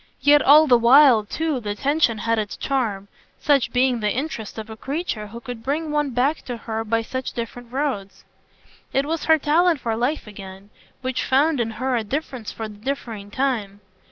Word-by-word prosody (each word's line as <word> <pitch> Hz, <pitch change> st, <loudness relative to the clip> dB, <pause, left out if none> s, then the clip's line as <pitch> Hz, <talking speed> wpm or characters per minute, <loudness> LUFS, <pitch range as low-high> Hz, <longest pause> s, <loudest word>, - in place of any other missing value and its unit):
Yet 290 Hz, 0 st, +6 dB
all 300 Hz, +4 st, +7 dB
the 245 Hz, -5 st, +5 dB
while 245 Hz, -1 st, +6 dB
too 310 Hz, +4 st, -2 dB
the 205 Hz, -3 st, -4 dB
tension 275 Hz, -2 st, +1 dB
had 230 Hz, +1 st, 0 dB
its 210 Hz, -1 st, -4 dB
charm 220 Hz, -8 st, -2 dB, 0.3 s
such 280 Hz, -4 st, +2 dB
being 250 Hz, -1 st, +2 dB
the 210 Hz, -1 st, 0 dB
interest 245 Hz, -5 st, -4 dB
of 220 Hz, -1 st, -6 dB
a 220 Hz, -, -8 dB
creature 270 Hz, -4 st, -4 dB
who 230 Hz, +3 st, -9 dB
could 245 Hz, -2 st, -8 dB
bring 300 Hz, +5 st, -2 dB
one 295 Hz, -1 st, 0 dB
back 265 Hz, +5 st, 0 dB
to 245 Hz, -2 st, -5 dB
her 225 Hz, -1 st, -4 dB
by 225 Hz, +1 st, 0 dB
such 260 Hz, +2 st, -5 dB
different 235 Hz, 0 st, -7 dB
roads. 255 Hz, -8 st, -3 dB, 0.7 s
It 270 Hz, +1 st, +1 dB
was 320 Hz, +1 st, -3 dB
her 320 Hz, 0 st, +5 dB
talent 320 Hz, +2 st, +2 dB
for 230 Hz, -2 st, -2 dB
life 250 Hz, +7 st, -1 dB
again; 195 Hz, -1 st, -11 dB, 0.3 s
which 260 Hz, -1 st, -2 dB
found 285 Hz, +2 st, +2 dB
in 230 Hz, -1 st, 0 dB
her 255 Hz, +1 st, 0 dB
a 230 Hz, -, 0 dB
difference 255 Hz, -1 st, -4 dB
for 225 Hz, -, -6 dB
the 210 Hz, -1 st, -12 dB
differing 225 Hz, -5 st, -5 dB
time. 215 Hz, -5 st, -2 dB
245 Hz, 190 wpm, -22 LUFS, 220-285 Hz, 0.7 s, all